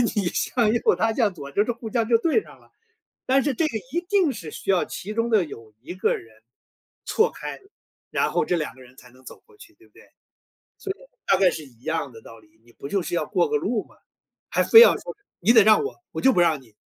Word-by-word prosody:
你 205 -3 0
向 225 +2 0
右 235 - +2
他 225 0 0
向 220 -4 +1
左， 140 -3 -9
就 200 - +2
是 240 - -2
互 230 -1 -8
相 230 -3 0
就 230 - +5
对 330 - +1
上 - - -17
了。 - - -25 0.6
但 270 +1 +3
是 285 -1 -1
这 315 - +1
个 230 -8 -3 0.2
一 345 - 0
定 385 -6 +3
是 165 -10 -8
需 - - -4
要 185 -2 +3
其 210 +3 -7
中 230 +1 -1
的 215 -5 +3
有 115 -6 -12
一 155 +8 -8
个 185 - 0
人， 110 -1 -18 0.6
错 445 - +2
开， - - -8 0.5
然 - - 0
后 - - +1
这 175 - 0
2 155 -5 -4
个 130 - -18
人 130 +1 -18
才 125 - -16
能 130 +2 -22
走 - - -12
过 450 -2 -23
去， 335 - -16
对 355 +3 -23
不 - - -30
对？ - - -19 0.7
所 390 - -7
以 - - -21 0.3
大 - - +3
概 185 -1 +4
是 160 -2 -7
一 120 -3 -22
样 160 -2 -2
的 115 -1 -14
道 115 - -13
理。 110 0 -25
你 120 - -21
不 140 - -9
就 195 +4 -1
是 175 - -5
要 175 - -1
过 - - +1
个 445 - +1
路 - - -2
吗？ - - -23 0.5
还 - - +2
非 455 - +9
要 480 - +7
说， - - -8 0.3
你 205 +6 +4
得 225 -2 +7
让 215 - +5
我， 425 - -5 0.2
我 - - -4
就 265 - +5
不 180 - +2
让 160 -5 +2
你！ 115 -4 -23
200 Hz, 275 characters per minute, -23 LUFS, -, 0.7 s, 非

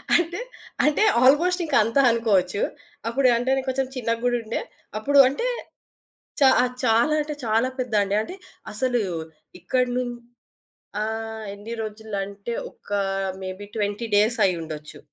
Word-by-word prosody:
అంటే, 345 +3 +1 0.5
అంటే 300 +8 +3 0.2
ఆల్‌మోస్ట్ 340 +8 +4
ఇంక 305 -3 -1
అంతా 230 +6 +2
అనుకోవచ్చు. 205 -5 +1 0.5
అప్పుడు 255 +3 +2
అంటే 245 +2 -1
నేను 265 - -1
కొంచెం 260 0 0
చిన్నగా 230 -2 -1
గూడుండే 240 -2 -1 0.4
అప్పుడు 280 +6 +3
అంటే 285 - -1 0.9
చా 270 - +8
ఆహ్, 250 0 -1
చాలా 235 +5 +3
అంటే 300 0 -4
చాలా 225 +3 +2
పెద్ద 250 -3 -3
అండి. 200 0 -1
అంటే 290 +12 -6 0.4
అసలు 245 +2 +1 0.6
ఇక్కడి 250 +8 0
నుం 250 -1 -1 0.9
ఆహ్, 220 0 -4
ఎన్ని 205 +3 -8
రోజులంటే 210 0 -5 0.2
ఒక - - -19 0.5
మేబి 190 +2 -6
20 205 +2 -1
డేస్ 215 +3 +3
అయ్యుండొచ్చు. 160 -4 -4
230 Hz, 130 wpm, -24 LUFS, 210-260 Hz, 0.9 s, చా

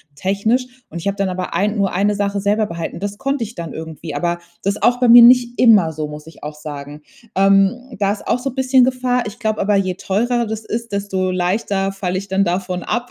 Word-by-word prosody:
technisch. 200 - 0 0.2
Und 170 - -8
ich 180 - -5
habe 200 - 0
dann 195 -1 0
aber 180 0 -4
ein 210 +2 0
nur 195 -3 0
eine 205 +3 +1
Sache 200 0 -1
selber 210 +2 +1
behalten. 170 -3 -6
Das 205 +1 -4
konnte 275 -1 -1
ich 225 +3 -11
dann 170 -1 -6
irgendwie. 160 -1 -7
Aber 175 +3 -1 0.2
das 200 +1 0
ist - - -10
auch 245 0 +3
bei 250 - +3
mir 240 +1 +10
nicht 245 0 +5
immer 200 -10 +5
so, 155 0 -4
muss 150 +1 -10
ich 160 - -15
auch 150 0 -6
sagen. 145 0 -8 0.3
Ähm, 195 +6 +2
da 200 0 +2
ist 205 - -6
auch - - +1
so 270 +2 -3
bisschen 260 0 +3
Gefahr. 250 -1 0
Ich 210 +3 -9
glaube 220 -2 -1
aber, 205 +1 +2
je 185 -2 0
teurer 235 +6 0
das 220 0 -5
ist, 230 0 -4
desto 195 -2 -1
leichter 195 +2 -1
falle 185 -2 -3
ich 195 - -5
dann 195 0 +1
davon 180 0 -2
ab, 245 0 -2
200 Hz, 235 wpm, -19 LUFS, 180-235 Hz, 0.3 s, mir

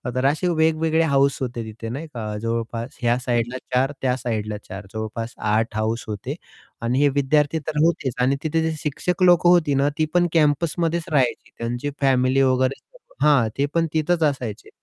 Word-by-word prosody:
तर 130 - 0
असे 155 +6 +2
वेगवेगळे 160 -1 +2
हाऊस 140 -3 +2
होते 120 -2 -3
तिथे 110 +1 -7
नाही 145 +7 -5
का, 110 -6 -5
जवळपास 115 +1 -3
ह्या 120 0 +2
साइडला 120 0 -1 0.2
4 130 +2 +2
त्या 130 -1 +1
साइडला 110 -4 -3
4 95 +1 -8
जवळपास 110 +1 -5
8 110 +1 0
हाऊस 110 +2 -1
होते 105 -2 -4 0.5
आणि 120 +3 0
हे 145 0 +4
विद्यार्थी 145 +3 +1
तर 155 - -3
होतेच 160 -6 +1
आणि 135 +2 +3
तिथे 160 +1 0
जे 160 0 0
शिक्षक 175 +4 -1
लोक 175 -1 +5
होती 170 -5 +4
ना, 140 +1 +2
ती 155 - +2
पण 175 0 +3
कॅम्पसमध्येच 165 +2 +1
राहायची 135 -5 0
त्यांची 120 +4 -3
फॅमिली 130 0 +3
वगैरे 130 0 +1 0.4
हां, 140 -7 +4
ते 140 - +2
पण 165 0 +2
तिथेच 160 +1 +1
असायचे. 125 -8 -2
135 Hz, 175 wpm, -22 LUFS, 115-155 Hz, 0.5 s, लोक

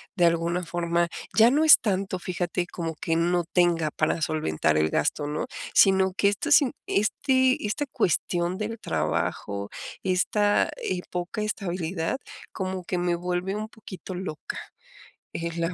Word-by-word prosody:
de 175 - +2
alguna 170 +1 +1
forma 170 0 0 0.3
ya 230 +3 +7
no 305 +3 +3
es 310 - +9
tanto, 195 -2 -1
fíjate, 175 0 -2
como 165 -2 -5
que 165 +1 -1
no 175 +1 +2
tenga 170 -3 +3
para 155 +2 0
solventar 80 - 0
el 80 0 +2
gasto, 145 - 0
¿no?, 150 +1 -3 0.3
sino 190 -1 +5
que 200 - +3
esta 205 +10 -3
sin 280 -4 +6 0.2
este 260 +5 +2
esta 290 +8 -1
cuestión 180 -5 0
del 215 +1 -4
trabajo, 100 0 -2 0.3
esta, 205 +3 +2
eh, 180 -1 -2
poca 180 +4 -3
estabilidad, 180 -3 -2 0.4
como 185 -1 -4
que 180 - -2
me 175 -1 +1
vuelve 180 +2 -2
un 215 +1 -4
poquito 190 -4 -9
loca. 180 -4 -6 0.8
Eh, 170 0 -3
la 170 +2 -1
180 Hz, 150 wpm, -26 LUFS, 170-200 Hz, 0.8 s, es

